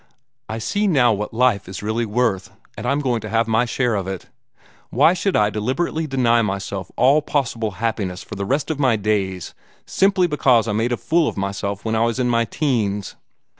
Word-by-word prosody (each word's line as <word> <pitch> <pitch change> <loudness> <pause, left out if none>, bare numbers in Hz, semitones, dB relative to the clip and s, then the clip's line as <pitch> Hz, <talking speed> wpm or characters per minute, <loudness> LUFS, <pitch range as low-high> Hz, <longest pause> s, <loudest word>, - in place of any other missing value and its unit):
I 110 - -3
see 205 - -1
now 125 - +4
what 105 0 -4
life 115 -5 +1
is 95 +1 -7
really 110 +2 -1
worth, 105 -4 0 0.3
and 115 +2 -5
I'm 140 +3 +1
going 125 -5 0
to 110 - -7
have 115 +1 +1
my 115 +2 +2
share 120 0 0
of 100 -3 -2
it. 95 -1 -5 0.6
Why 150 +8 +4
should 190 +1 -1
I 105 0 +3
deliberately 145 +9 -2
deny 120 -4 +2
myself 100 -2 -3
all 140 +4 +4
possible 120 -8 -2
happiness 105 -5 -2
for - - -10
the 100 0 -4
rest 140 +10 -1
of 150 - -4
my 130 -5 +3
days, 100 -4 -2 0.3
simply 190 -1 +2
because 130 -8 +3
I - - 0
made 110 +4 0
a 120 - 0
fool 165 -1 +1
of - - -4
myself 100 +1 -3
when 110 - -1
I 110 - +2
was 115 0 0
in 125 -1 0
my 115 -1 +2
teens? 105 -7 -1
115 Hz, 205 wpm, -21 LUFS, 105-135 Hz, 0.6 s, now